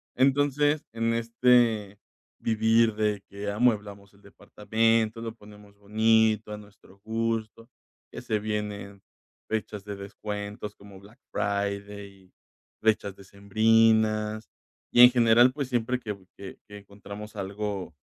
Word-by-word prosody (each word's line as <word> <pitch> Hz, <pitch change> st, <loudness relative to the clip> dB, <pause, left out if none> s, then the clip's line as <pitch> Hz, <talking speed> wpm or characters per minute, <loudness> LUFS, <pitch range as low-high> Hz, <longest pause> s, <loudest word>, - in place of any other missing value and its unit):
Entonces, 145 Hz, +3 st, +2 dB
en 115 Hz, 0 st, 0 dB
este 115 Hz, -3 st, +2 dB, 0.4 s
vivir, 110 Hz, 0 st, +2 dB
de 105 Hz, -2 st, 0 dB
que 100 Hz, +1 st, -5 dB
amueblamos 105 Hz, -3 st, -1 dB
el 100 Hz, -, -23 dB
departamento, 110 Hz, +2 st, 0 dB
lo 115 Hz, -1 st, -5 dB
ponemos 105 Hz, -1 st, -16 dB
bonito 110 Hz, +1 st, +2 dB
a -, -, -5 dB
nuestro 100 Hz, -2 st, -18 dB
gusto, 115 Hz, +1 st, -3 dB, 0.4 s
que -, -, -8 dB
se 110 Hz, -, -1 dB
vienen 105 Hz, -2 st, -5 dB, 0.5 s
fechas 105 Hz, -2 st, -4 dB
de 100 Hz, -1 st, -6 dB
descuentos 105 Hz, +1 st, -7 dB
como 100 Hz, -1 st, -14 dB
Black 105 Hz, +6 st, -18 dB
Friday, 100 Hz, -1 st, -4 dB, 0.5 s
fechas 105 Hz, -3 st, +1 dB
decembrinas. 110 Hz, +2 st, +1 dB, 0.4 s
Y 120 Hz, -, +6 dB
en 125 Hz, -, +11 dB
general, 120 Hz, +1 st, +5 dB
pues 140 Hz, -2 st, -4 dB
siempre 125 Hz, +1 st, -1 dB
que 105 Hz, -4 st, -5 dB, 0.2 s
que 100 Hz, -, -9 dB
que 105 Hz, 0 st, -10 dB
encontramos 100 Hz, +1 st, -11 dB
algo, 100 Hz, -3 st, -5 dB
105 Hz, 120 wpm, -27 LUFS, 100-115 Hz, 0.5 s, en